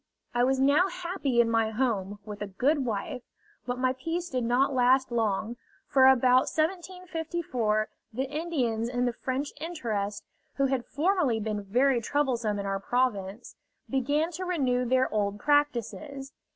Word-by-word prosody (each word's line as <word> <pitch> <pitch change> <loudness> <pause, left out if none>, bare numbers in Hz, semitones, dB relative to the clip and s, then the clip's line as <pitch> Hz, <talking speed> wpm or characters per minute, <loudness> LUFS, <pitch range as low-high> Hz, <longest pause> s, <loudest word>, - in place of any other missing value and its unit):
I 240 0 +2
was 265 +1 +2
now 285 +7 +4
happy 340 -9 0
in 235 - +1
my 225 -1 +2
home, 210 -4 -1
with 210 -1 -8
a 205 - -2
good 265 +8 +1
wife; 225 +2 -3 0.5
but 245 0 -2
my 255 0 +1
peace 330 +7 -4
did 255 -2 -1
not 250 +4 +2
last 260 +1 +3
long, 225 0 -1 0.3
for 265 -1 +5
about 255 0 +5
1754 325 - -1 0.2
the 250 +4 -2
Indians 270 -6 -1
in 245 0 0
the 245 - 0
French 265 +4 -3
interest, 220 -12 -3 0.3
who 275 - +2
had 265 -2 -1
formerly 300 - +1
been 210 -1 -2
very 245 +5 +2
troublesome 235 -5 0
in 200 - -4
our 195 0 -1
province, 215 -2 -1 0.3
began 290 +5 0
to 360 +2 -5
renew 260 -9 0
their 260 +1 +3
old 205 -1 0
practices. 280 0 0
255 Hz, 150 wpm, -28 LUFS, 225-290 Hz, 0.5 s, for